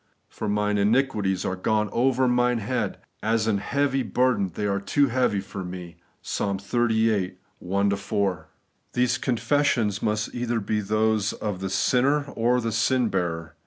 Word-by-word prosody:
For 110 - -4
mine 105 0 +1
iniquities 105 -4 +1
are 95 - -1
gone 105 +3 0
over 130 +2 +2
mine 125 0 +2
head; 110 -1 -2 0.2
as 110 0 +1
an 105 -3 +1
heavy 135 +4 0
burden, 125 -7 +1
they 105 - -2
are 100 -1 0
too 140 +6 +2
heavy 125 -4 +1
for 95 0 -7
me 90 -1 -8
' - - -41
(Ps. - - -3
xxxviii. 110 -1 +1 0.2
1 100 +2 0
4).. 100 -5 -2 0.5
These 125 -1 +1
confessions 120 -4 +1
must 105 0 -1
be - - -6
either 120 -1 -1
those 110 0 0
of 105 -4 -4
the 95 0 -3
sinner 130 +9 +2
or 120 +2 +2
the 115 -1 -2
sin 120 +2 +2
bearer. 85 -4 -2
110 Hz, 160 wpm, -25 LUFS, 100-125 Hz, 0.5 s, over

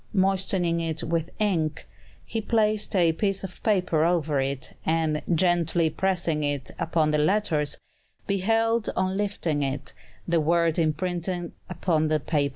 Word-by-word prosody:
Moistening 190 -3 +1
it 165 0 -2
with 165 0 -1
ink, 165 -8 0 0.4
he 225 - -3
placed 215 -2 +1
a 170 -3 +4
piece 195 +2 0
of 185 -2 -8
paper 180 -8 +2
over 160 -4 +1
it, 135 -1 -2
and, 160 -1 +1
gently 170 -1 +2
pressing 170 -4 0
it 145 -2 -2
upon 160 -2 +1
the 150 - +2
letters, 155 -3 +1 0.5
beheld, 225 +3 +1
on 185 0 0
lifting 195 -7 -1
it, 135 0 -3 0.3
the 170 -1 +2
word 170 +1 +2
imprinted 175 +2 -1 0.2
upon 165 -3 0
the 155 0 +1
paper. 145 -1 0
170 Hz, 140 wpm, -26 LUFS, 155-190 Hz, 0.5 s, a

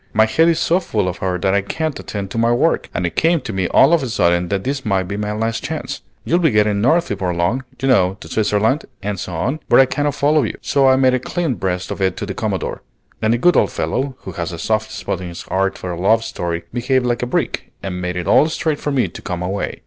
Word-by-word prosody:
"My 110 0 +5
head 160 +9 +3
is 165 - +2
so 170 +2 +2
full 110 - -1
of 90 - -3
her 90 -1 -1
that 95 +2 0
I 100 - +3
can't 155 +9 -3
attend 100 -2 -5
to 115 - -2
my 115 +1 +3
work, 120 - +1
and 90 - -2
it 85 - -3
came 165 +1 +3
to 110 - -6
me 95 -2 0
all 170 - +5
of 170 - +4
a 130 - -3
sudden 85 -4 +2
that 100 -1 -1
this 135 +1 -2
might 95 -3 +1
be 95 +2 -5
my 105 0 -2
last 115 +2 -2
chance. - - -4 0.2
You'll 170 - +2
be 165 -3 +3
getting 105 -3 +2
north 165 +9 +3
before 90 -2 -2
long, 85 +10 0 0.2
you 135 - -1
know, 95 -7 +3
to - - -10
Switzerland 110 +6 +1 0.2
and 100 -2 -3
so 90 0 -5
on, 135 - -1
where - - +5
I 135 - +8
cannot 145 +1 -1
follow 150 +2 +3
you. 110 - -2
So 140 -2 +2
I 130 - +6
made 130 -1 +3
a 130 - +2
clean 165 +2 -2
breast 90 -2 -3
of - - -5
it 95 -1 +1
to - - -3
the 100 - -4
Commodore; 100 -3 -3 0.4
and 110 - +2
the - - 0
good 175 +8 +4
old - - +3
fellow, 135 +1 -2
who 95 - -7
has 85 -1 -4
a 85 - -6
soft 110 +5 -1
spot 95 - -4
in 90 - -5
his 85 -1 -8
heart 95 0 -1
for 90 - -5
a 85 0 -5
love 110 +4 +3
story, 85 -5 -3
behaved 125 +1 +1
like 120 -1 0
a 125 - -1
brick, - - -2
and 90 -2 -4
made 90 0 -3
it 90 -1 -3
all 155 - +4
straight 155 -2 -1
for 145 - -2
me 130 -7 +2
to 85 - -10
come 90 0 -4
away." 95 +3 -3
110 Hz, 270 wpm, -19 LUFS, 95-135 Hz, 0.4 s, I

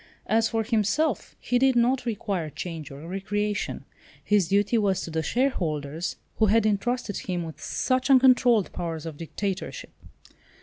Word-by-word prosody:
As 225 0 +2
for 225 -1 0
himself, 225 - 0
he 245 0 +1
did 265 0 +4
not 245 +1 +2
require 200 -7 -2
change 160 -1 -6
or 140 +4 -10
recreation, 205 +2 -2 0.4
his 205 -5 +3
duty 205 +5 +2
was 195 -3 +1
to 165 - -6
the 160 0 0
shareholders, 160 - -1 0.2
who 220 - +4
had 220 +2 +3
entrusted 215 +1 0
him 180 -2 -3
with 160 -1 -9
such 255 +1 0
uncontrolled 250 -5 +5
powers 165 -2 -4
of 160 -2 -6
dictatorship. 190 +4 -5
205 Hz, 145 wpm, -26 LUFS, 170-240 Hz, 0.4 s, uncontrolled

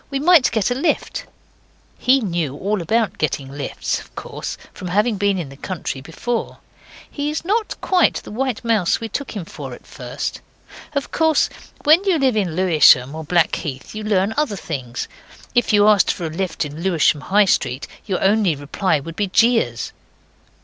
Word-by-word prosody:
We 275 - -2
might 310 -1 +5
get 220 0 0
a - - +4
lift.' 340 - -1 0.7
He 265 +1 +4
knew 170 - -2
all 205 +2 -1
about 220 +6 0
getting 140 -3 -2
lifts, 140 0 -3
of - - -15
course, - - -6 0.2
from 185 - -7
having 210 +4 +1
been 200 0 +1
in 165 -6 -4
the 135 - -11
country 145 -3 -5
before. 230 - -4 0.5
He 290 0 -3
is 310 +2 -4
not 430 +3 -1
quite 365 -2 +3
the - - -6
white 245 +1 -2
mouse 220 -6 +2
we 225 - -4
took 275 +2 -4
him 195 -5 -4
for - - -8
at - - -18
first. - - -5 0.5
Of 280 -2 -2
course 320 -2 +3 0.3
when 315 +6 +6
you 380 -4 +2
live 265 -5 +2
in 185 -7 0
Lewisham 155 -7 +5
or 160 0 -6
Blackheath 155 -4 -1
you 215 0 -5
learn 205 0 +1
other 295 -9 +1
things. 130 -9 -5 0.5
If 245 -1 +2
you 205 0 +5
asked 210 -2 +5
for 175 - -5
a - - -2
lift 175 -1 -2
in 150 +2 -7
Lewisham, 165 -5 +2
High 205 +5 +3
Street, 130 -7 0 0.2
your 190 -3 -1
only 195 -4 +3
reply 145 +5 0
would 165 +4 -8
be 205 - 0
jeers. 200 - +2
200 Hz, 180 wpm, -20 LUFS, 160-245 Hz, 0.7 s, when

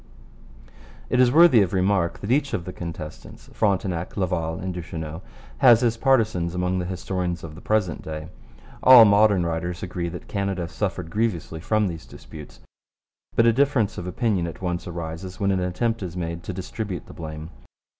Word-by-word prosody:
It 125 - +2
is 125 -1 +5
worthy 155 -6 +7
of 95 -2 0
remark 95 -2 +1
that 105 - -3
each 140 +1 +1
of 85 - -4
the 90 - -6
contestants, 80 -3 -9
Frontenac, 95 -4 -1
Laval, 85 -4 -1
and 95 0 -4
Duchesneau, 80 -1 -6 0.4
has 120 -1 +7
his 120 -2 +2
partisans 110 -9 +1
among 90 +1 0
the 90 - -3
historians 90 -2 -3
of 80 -2 -8
the 85 - -12
present 105 -6 0
day. 80 0 -7 0.5
All 125 -3 +10
modern 100 -3 +4
writers 85 +1 -3
agree 90 -1 -3
that 85 +1 -9
Canada 100 -3 -2
suffered 90 -3 -4
grievously 100 -7 -2
from 110 +5 +1
these 85 -3 -7
disputes, 75 -1 -12 0.7
but 115 - +4
a 115 - +5
difference 135 -5 +1
of 90 - -6
opinion 95 -3 0
at 85 - -8
once 90 0 -3
arises 85 +2 -6
when 100 -1 +1
an 95 - +1
attempt 110 +6 -1
is 90 -2 -5
made 85 -1 -4
to - - -3
distribute 95 +1 -5
the - - -12
blame. 80 0 -7
90 Hz, 175 wpm, -24 LUFS, 85-105 Hz, 0.7 s, All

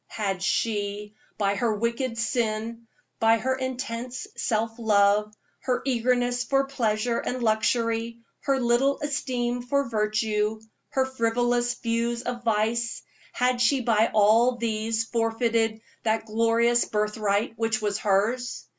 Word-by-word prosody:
Had 195 -4 -3
she, 205 0 -1 0.2
by 200 -1 +1
her 225 +1 0
wicked 235 +2 -2
sin, 230 0 -2 0.3
by 225 0 +4
her 260 +3 0
intense 255 -1 -4
self 225 0 -1
love, 210 -1 +3 0.3
her 250 -2 -1
eagerness 245 -1 +1
for 275 0 +1
pleasure 235 -3 0
and 250 -1 -3
luxury, 230 +1 0 0.2
her 275 -1 0
little 250 +3 +2
esteem 245 -4 -1
for 280 +3 0
virtue, 215 0 0 0.3
her 265 -1 +1
frivolous 240 -1 0
views 235 0 -1
of 240 -1 -4
vice 225 +1 0 0.3
had 250 0 +1
she 260 +2 +3
by 225 -2 +3
all 220 +4 +4
these 225 -1 -1
forfeited 225 -1 0 0.2
that 220 0 0
glorious 230 +2 +2
birth 210 0 -1
right 205 0 0
which 225 -1 0
was 210 -1 -1
hers? 220 +5 0
230 Hz, 130 wpm, -26 LUFS, 215-245 Hz, 0.3 s, by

